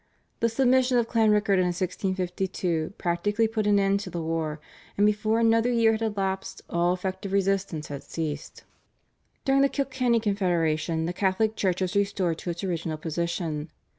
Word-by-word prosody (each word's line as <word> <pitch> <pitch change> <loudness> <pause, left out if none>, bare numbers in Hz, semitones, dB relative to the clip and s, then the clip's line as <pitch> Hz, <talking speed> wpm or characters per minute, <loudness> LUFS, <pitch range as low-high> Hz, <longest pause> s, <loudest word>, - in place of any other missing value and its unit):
The 230 - +2
submission 255 +1 +3
of 235 -1 +2
Clanrickard 210 -4 +3
in 180 - +2
1652 185 -1 -2
practically 205 +6 +1
put 220 -1 -1
an 205 -1 +4
end 195 0 +2
to 200 -2 -6
the 175 -1 -4
war, 160 -1 -2 0.4
and 205 - +4
before 215 +2 +2
another 230 +1 +3
year 230 -2 +4
had 220 0 -2
elapsed 195 -3 -2
all 170 +1 +2
effective 190 +2 -4
resistance 195 -5 0
had 140 -1 -5
ceased. 155 -3 -5 0.8
During 275 0 +4
the 275 - +4
Kilkenny 260 -4 +1
Confederation 170 -6 0
the 175 - -2
Catholic 205 +4 +1
Church 185 -3 0
was 185 +2 -1
restored 195 -4 0
to - - -5
its 170 +1 -4
original 165 -4 -2
position. 160 -1 -3
195 Hz, 160 wpm, -26 LUFS, 170-220 Hz, 0.8 s, an